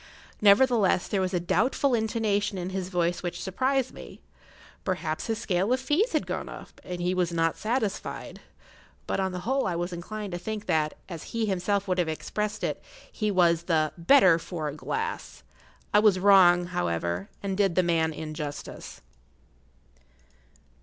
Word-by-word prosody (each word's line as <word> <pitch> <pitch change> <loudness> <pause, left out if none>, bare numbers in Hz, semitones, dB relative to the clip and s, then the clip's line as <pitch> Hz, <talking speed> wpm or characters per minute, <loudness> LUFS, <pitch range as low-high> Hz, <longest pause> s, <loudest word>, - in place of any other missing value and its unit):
Nevertheless, 210 -2 +4
there 195 - 0
was 185 -1 -1
a 180 - 0
doubtful 245 - +1
intonation 215 -3 0
in 180 +1 -4
his 185 -1 -3
voice 175 -1 0
which 175 -1 -4
surprised 260 +7 0
me. - - -11 0.6
Possibly 180 -5 -2
his 225 -1 -1
scale 195 0 0
of 255 - +3
fees 330 - +1
had - - +1
gone - - -4
up, - - -11
and 180 -1 -6
he 180 +1 0
was 180 -2 0
not 165 -1 +1
satisfied; 220 -3 -3 0.6
but - - -2
on 190 -1 0
the 180 0 -5
whole 265 +6 0
I 175 - -1
was 175 +1 -3
inclined 205 +4 -6
to 175 - -3
think 215 +3 -5
that, 155 -1 0
as 170 -4 -7 0.2
he 225 - +1
himself 200 +1 0
would 185 -1 0
have 170 -2 +1
expressed 210 +6 -3
it, - - -2 0.3
he 215 -2 -1
was 170 -3 +3
"the 155 -3 +1
better 175 -1 +5
for 165 -2 -5
a - - -6
glass." 455 - -4 0.5
I 210 - +7
was 210 -3 +5
wrong, 185 -2 +6
however, 85 - -2
and 195 -1 -2
did 195 -3 +1
the 185 - +4
man 165 -2 +1
injustice. 155 -1 -7
185 Hz, 165 wpm, -27 LUFS, 170-215 Hz, 0.6 s, I